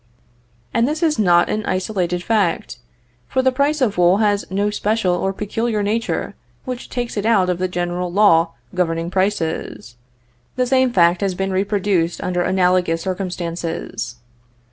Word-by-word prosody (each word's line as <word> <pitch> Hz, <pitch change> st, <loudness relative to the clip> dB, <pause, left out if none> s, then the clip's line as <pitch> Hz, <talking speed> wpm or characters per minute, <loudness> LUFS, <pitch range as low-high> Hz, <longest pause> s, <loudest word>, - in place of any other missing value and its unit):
And 230 Hz, +1 st, +2 dB
this 310 Hz, +4 st, -2 dB
is 305 Hz, -7 st, +2 dB
not 175 Hz, -4 st, +4 dB
an 215 Hz, -, -2 dB
isolated 180 Hz, -2 st, -1 dB
fact, 195 Hz, -, 0 dB, 0.5 s
for 260 Hz, -, 0 dB
the 260 Hz, -, +4 dB
price 285 Hz, +3 st, 0 dB
of 210 Hz, -8 st, +1 dB
wool 175 Hz, +2 st, +5 dB
has 205 Hz, -1 st, +1 dB
no 200 Hz, +2 st, 0 dB
special 210 Hz, -2 st, 0 dB
or 190 Hz, +2 st, 0 dB
peculiar 210 Hz, +2 st, -2 dB
nature 220 Hz, +3 st, -1 dB, 0.3 s
which 255 Hz, -2 st, -6 dB
takes 240 Hz, -3 st, -4 dB
it 205 Hz, -, -1 dB
out 200 Hz, -5 st, +3 dB
of 180 Hz, -, -3 dB
the 185 Hz, -, 0 dB
general 175 Hz, 0 st, -3 dB
law 170 Hz, -4 st, +4 dB, 0.2 s
governing 170 Hz, -1 st, -1 dB
prices. 160 Hz, -, -2 dB, 0.6 s
The 255 Hz, 0 st, +1 dB
same 260 Hz, 0 st, +2 dB
fact 175 Hz, -4 st, +3 dB
has 195 Hz, -2 st, 0 dB
been 195 Hz, +1 st, -2 dB
reproduced 190 Hz, -3 st, 0 dB
under 180 Hz, -1 st, -1 dB
analogous 180 Hz, -2 st, +1 dB
circumstances. 170 Hz, -, -4 dB
190 Hz, 150 wpm, -20 LUFS, 175-215 Hz, 0.6 s, wool